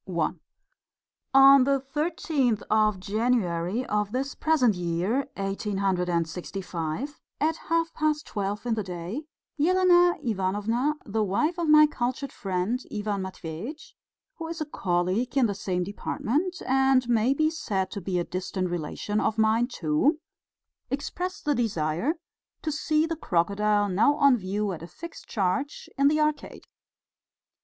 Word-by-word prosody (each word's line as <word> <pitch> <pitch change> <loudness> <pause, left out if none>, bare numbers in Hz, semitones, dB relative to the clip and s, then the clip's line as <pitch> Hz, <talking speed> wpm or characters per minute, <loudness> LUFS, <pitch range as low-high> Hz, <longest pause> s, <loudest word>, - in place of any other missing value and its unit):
I 170 -4 +1 1.1
On 270 0 +9
the 275 +1 +2
thirteenth 275 -4 -1
of 215 -2 +3
January 205 -1 0
of 210 -1 -1
this 270 +3 -2
present 285 -8 +3
year, 180 +9 -1
1865, 190 - -2 0.2
at 315 +2 +1
half 330 0 +1
past 305 -1 0
twelve 205 +1 -3
in 240 - +1
the 220 - -1
day, 185 - -5 0.3
Elena 355 +1 +4
Ivanovna, 225 +6 0
the 215 +1 0
wife 305 - 0
of 335 -2 0
my 305 0 +8
cultured 260 -1 -3
friend 190 +5 -1
Ivan 205 -2 -2
Matveitch, 190 - -7 0.4
who 330 - -5
is 330 0 -5
a 310 - -2
colleague 190 +1 -1
in 265 - +5
the 205 - 0
same 180 -2 -2
department, 290 - -2
and 265 -1 +3
may 240 +3 +2
be 310 +2 +2
said 200 - -2
to 200 - -5
be 185 0 -2
a 175 - +1
distant 185 +1 -3
relation 175 +5 -2
of 220 - 0
mine, 220 +2 +3
too, 190 - +1 0.7
expressed 345 +7 -4
the 295 - +3
desire 215 - 0 0.5
to 310 - -1
see 305 +1 +1
the 330 0 -2
crocodile 205 - +1
now 210 +10 +3
on 280 -3 +5
view 205 0 -2
at 170 - -6
a 170 - -8
fixed 335 - -10
charge 205 +8 -1
in 275 +1 +4
the 305 +1 +3
Arcade. 305 0 -1
225 Hz, 140 wpm, -26 LUFS, 190-290 Hz, 1.1 s, On